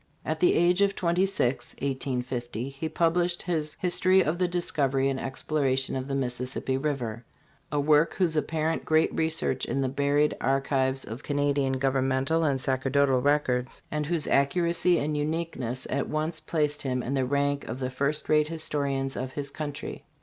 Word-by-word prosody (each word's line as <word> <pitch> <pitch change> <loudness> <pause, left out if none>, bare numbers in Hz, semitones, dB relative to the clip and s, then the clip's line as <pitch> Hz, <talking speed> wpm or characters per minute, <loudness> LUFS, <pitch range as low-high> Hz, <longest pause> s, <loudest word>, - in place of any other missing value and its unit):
At 155 0 -2
the 180 - +4
age 175 +3 +3
of 200 -1 +3
twenty 180 +2 +1
six 135 -10 -1
(1850), 125 -3 -3
he 140 +4 -5
published 175 +2 +1
his 155 -4 -2
" - - -35
History 185 +1 +4
of 165 +3 -1
the 180 - +3
Discovery 140 -6 +1
and 135 -1 -2
Exploration 135 -1 0
of 130 0 -3
the 135 - -2
Mississippi 125 0 -2
River," 130 -5 -2 0.5
a 145 - +1
work 150 +2 +3
whose 175 -4 +1
apparent 155 +2 0
great 160 0 +2
research 160 0 0
in 135 - -1
the 135 - +1
buried 145 +2 +2
archives 135 0 +1
of 115 +5 -7
Canadian 145 -2 0
govern 135 0 +1
mental 135 +5 +1
and 140 -4 +1
sacerdotal 135 0 +2
records, 130 -3 0
and 150 -1 -2
whose 165 -3 0
accuracy 170 +5 +2
and 150 +1 -1
uniqueness, 145 -5 -2
at 140 - -1
once 155 +1 -2
placed 150 -2 -1
him 130 -2 -1
in 135 - -3
the 135 -1 +1
rank 140 +1 0
of 115 - -4
the 130 -1 -3
first 140 +3 -1
rate 150 -1 +3
historians 140 -4 -2
of 130 +1 -4
his 140 -1 -4
country. 145 -2 -6
140 Hz, 170 wpm, -27 LUFS, 135-160 Hz, 0.5 s, the